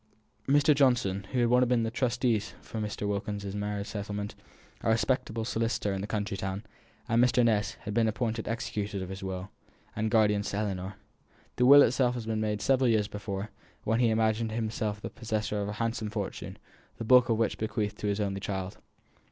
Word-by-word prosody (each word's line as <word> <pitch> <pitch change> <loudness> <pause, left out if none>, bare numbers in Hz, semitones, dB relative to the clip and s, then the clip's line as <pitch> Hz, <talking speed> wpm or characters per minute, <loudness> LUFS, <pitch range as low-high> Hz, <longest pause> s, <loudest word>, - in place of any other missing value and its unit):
Mr. 145 +2 +5
Johnson, 120 -9 +2
who 125 - +1
had - - +4
been - - +1 0.2
one - - -2
of 120 -2 +3
the 115 - -1
trustees 120 -3 0
for 110 - -7
Mrs. 105 -1 -3
Wilkins's 100 0 -3
marriage 105 0 -2
settlement, 105 0 -4 0.5
a - - 0
respectable 115 -1 0
solicitor 115 -3 -1
in 95 - -3
the 100 - -4
county 105 -1 -2
town, 95 +1 -4 0.4
and 115 0 +4
Mr. 125 -1 +4
Ness, 105 -3 +2
had 105 - -5
been 115 0 +3
appointed 110 0 -2
executors 105 -4 -3
of 95 - -7
his 95 +1 -6
will, 95 0 -5 0.4
and 110 +1 0
guardians 105 -2 +3
to 100 - -3
Ellinor. 95 -2 -3 0.6
The 125 - +4
will 140 +1 +10
itself 125 +1 +2
had 120 -2 -5
been 110 -1 -1
made 105 -1 -1
several 135 -1 +3
years 110 -3 +2
before, 100 0 -5 0.3
when 115 +2 +1
he 120 -2 +4
imagined 110 0 +1
himself 110 -2 -2
the - - -6
possessor 110 -2 -2
of 100 - -2
a - - -3
handsome 115 -1 -2
fortune, 105 - -5 0.4
the - - -4
bulk 125 +1 +6
of 115 - +2
which 115 -1 +1
he - - -12
bequeathed 105 -1 -2
to 105 - -2
his 100 0 0
only 100 -2 -1
child. 95 -1 -4
110 Hz, 200 wpm, -29 LUFS, 100-115 Hz, 0.6 s, will